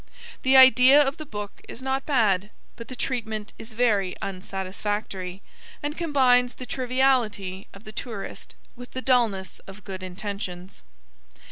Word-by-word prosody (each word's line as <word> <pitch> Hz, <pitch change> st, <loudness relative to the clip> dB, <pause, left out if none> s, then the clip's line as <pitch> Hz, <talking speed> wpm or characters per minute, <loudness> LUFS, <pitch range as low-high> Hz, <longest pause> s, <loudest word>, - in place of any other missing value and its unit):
The 265 Hz, +1 st, +5 dB
idea 260 Hz, +2 st, +8 dB
of 285 Hz, +1 st, +2 dB
the 310 Hz, -, -8 dB
book 205 Hz, -3 st, -7 dB
is -, -, -8 dB
not 265 Hz, 0 st, -2 dB
bad, 210 Hz, -8 st, +2 dB, 0.3 s
but 230 Hz, -, -9 dB
the 255 Hz, -, -7 dB
treatment 220 Hz, -4 st, -3 dB
is 225 Hz, +1 st, -10 dB
very 210 Hz, -6 st, +1 dB
unsatisfactory, 190 Hz, 0 st, -4 dB, 0.4 s
and 295 Hz, +1 st, -2 dB
combines 255 Hz, -7 st, +3 dB
the 255 Hz, -, -8 dB
triviality 245 Hz, -7 st, 0 dB
of 195 Hz, -, -14 dB
the 215 Hz, -, -9 dB
tourist 215 Hz, -2 st, -7 dB, 0.2 s
with 245 Hz, 0 st, -11 dB
the 260 Hz, -, -5 dB
dulness 230 Hz, -7 st, +1 dB
of 195 Hz, +1 st, -11 dB
good 190 Hz, -1 st, -7 dB
intentions. 185 Hz, -1 st, -6 dB
220 Hz, 140 wpm, -25 LUFS, 195-255 Hz, 0.4 s, idea